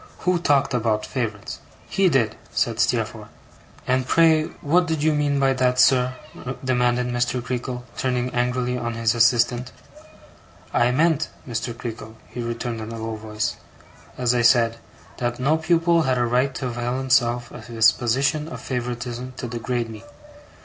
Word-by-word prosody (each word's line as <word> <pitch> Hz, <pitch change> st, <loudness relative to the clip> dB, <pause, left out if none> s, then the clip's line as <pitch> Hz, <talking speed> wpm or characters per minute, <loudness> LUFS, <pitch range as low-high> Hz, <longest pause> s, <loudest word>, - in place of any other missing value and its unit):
'Who 180 Hz, -1 st, +2 dB
talked 145 Hz, -6 st, +2 dB
about 110 Hz, -3 st, 0 dB
favourites?' 110 Hz, -6 st, -4 dB, 0.3 s
'He 195 Hz, -1 st, +2 dB
did,' 125 Hz, -8 st, +1 dB
said -, -, -1 dB
Steerforth. -, -, 0 dB, 0.6 s
'And 130 Hz, 0 st, +1 dB
pray, 160 Hz, 0 st, +4 dB, 0.2 s
what 175 Hz, +4 st, +2 dB
did 160 Hz, -2 st, -1 dB
you 155 Hz, 0 st, +3 dB
mean 145 Hz, -1 st, +1 dB
by 135 Hz, -1 st, +3 dB
that, 125 Hz, -1 st, +1 dB
sir?' 130 Hz, 0 st, +4 dB, 0.5 s
demanded 125 Hz, -1 st, +2 dB
Mr. 125 Hz, +1 st, 0 dB
Creakle, 125 Hz, 0 st, -4 dB, 0.2 s
turning 125 Hz, -1 st, -1 dB
angrily 125 Hz, 0 st, 0 dB
on 120 Hz, -1 st, -3 dB
his 115 Hz, -1 st, +1 dB
assistant. 120 Hz, +1 st, +2 dB, 1.0 s
'I 120 Hz, 0 st, +3 dB
meant, 155 Hz, +4 st, +2 dB, 0.2 s
Mr. 120 Hz, 0 st, -3 dB
Creakle,' 110 Hz, -2 st, -7 dB
he 120 Hz, -, -6 dB
returned 115 Hz, -1 st, -4 dB
in 110 Hz, +1 st, -6 dB
a 115 Hz, -, -6 dB
low 110 Hz, 0 st, -4 dB
voice, 110 Hz, 0 st, -3 dB, 0.6 s
'as 125 Hz, -1 st, +2 dB
I 120 Hz, -, +2 dB
said; 115 Hz, -1 st, +4 dB, 0.4 s
that 120 Hz, 0 st, -2 dB
no 145 Hz, +5 st, +2 dB
pupil 165 Hz, +1 st, +3 dB
had 130 Hz, -4 st, +1 dB
a 120 Hz, -, +2 dB
right 125 Hz, +3 st, +1 dB
to 130 Hz, -, -4 dB
avail 120 Hz, +1 st, -2 dB
himself 125 Hz, -2 st, +1 dB
of -, -, -10 dB
his 115 Hz, -1 st, +5 dB
position 135 Hz, +5 st, 0 dB
of -, -, -7 dB
favouritism 125 Hz, 0 st, -4 dB
to 125 Hz, -, -4 dB
degrade 120 Hz, 0 st, -2 dB
me. 110 Hz, -1 st, -10 dB
125 Hz, 160 wpm, -23 LUFS, 120-135 Hz, 1.0 s, his